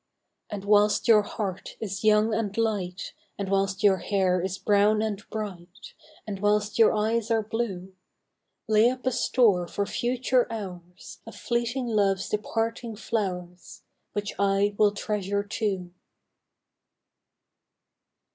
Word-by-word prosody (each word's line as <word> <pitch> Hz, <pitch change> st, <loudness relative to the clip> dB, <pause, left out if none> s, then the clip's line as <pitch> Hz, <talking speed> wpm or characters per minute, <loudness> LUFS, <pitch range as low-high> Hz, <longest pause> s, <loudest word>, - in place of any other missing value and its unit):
And 200 Hz, -1 st, -6 dB
whilst 205 Hz, 0 st, +3 dB
your 220 Hz, -2 st, +7 dB
heart 200 Hz, -2 st, -5 dB
is 195 Hz, -2 st, -5 dB
young 215 Hz, +1 st, +4 dB
and 215 Hz, -2 st, -2 dB
light, 195 Hz, -5 st, -2 dB, 0.2 s
And 200 Hz, -1 st, -4 dB
whilst 195 Hz, 0 st, 0 dB
your 195 Hz, -2 st, +5 dB
hair 185 Hz, -1 st, +1 dB
is 190 Hz, +1 st, -3 dB
brown 210 Hz, +1 st, +3 dB
and 210 Hz, -2 st, -3 dB
bright, 190 Hz, -4 st, -7 dB, 0.3 s
And 200 Hz, -3 st, -5 dB
whilst 210 Hz, +1 st, +1 dB
your 225 Hz, -, +7 dB
eyes 220 Hz, +1 st, 0 dB
are 225 Hz, -1 st, +2 dB
blue, 200 Hz, -4 st, -4 dB, 0.7 s
Lay 220 Hz, +2 st, +5 dB
up 255 Hz, 0 st, -6 dB
a 260 Hz, -, +2 dB
store 230 Hz, -7 st, +2 dB
for 200 Hz, +3 st, -2 dB
future 245 Hz, +2 st, 0 dB
hours 180 Hz, -5 st, -8 dB
Of -, -, -9 dB
fleeting 240 Hz, +1 st, -2 dB
love's 200 Hz, -4 st, +1 dB
departing 225 Hz, +2 st, -2 dB
flowVs 180 Hz, -5 st, -4 dB, 0.3 s
Which 205 Hz, -1 st, -3 dB
I 200 Hz, +1 st, +2 dB
will 210 Hz, 0 st, +4 dB
treasure 205 Hz, -1 st, -2 dB
too. 200 Hz, -4 st, -3 dB
205 Hz, 130 wpm, -26 LUFS, 195-225 Hz, 0.7 s, your